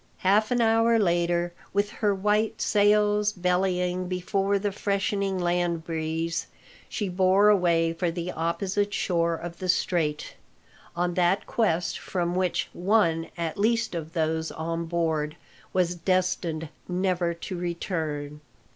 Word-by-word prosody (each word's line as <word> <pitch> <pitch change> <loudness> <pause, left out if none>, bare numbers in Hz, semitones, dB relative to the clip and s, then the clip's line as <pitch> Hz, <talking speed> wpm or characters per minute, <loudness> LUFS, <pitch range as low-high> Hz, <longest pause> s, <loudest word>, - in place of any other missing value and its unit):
Half 210 +3 +4
an 245 -1 +2
hour 225 0 +4
later, 175 -3 +1 0.2
with 200 +1 +1
her 210 -3 0
white 210 +3 +1
sails 210 0 +3
bellying 180 -1 0
before 195 +2 0
the 205 +1 -1
freshening 200 -1 -1
land 175 -2 0
breeze, 165 0 -2 0.4
she 210 - -2
bore 190 +3 +4
away 170 -4 +3
for 170 +1 -1
the 175 +1 -4
opposite 195 +5 -1
shore 170 -2 +1
of 170 +1 -8
the 185 - -4
Strait, 160 -4 0 0.6
on 175 0 0
that 180 +2 +2
quest 175 -7 0
from 175 -2 -2
which 185 -1 0
one 175 -4 +2
at 170 +2 -3
least 225 +1 +1
of 165 -1 -5
those 160 -1 -1
on 165 +1 -3
board 160 -3 -1 0.4
was 180 -2 +1
destined 175 -3 -1 0.2
never 180 -2 0
to 175 +2 -6
return. 160 -4 -3
180 Hz, 130 wpm, -26 LUFS, 170-200 Hz, 0.6 s, Half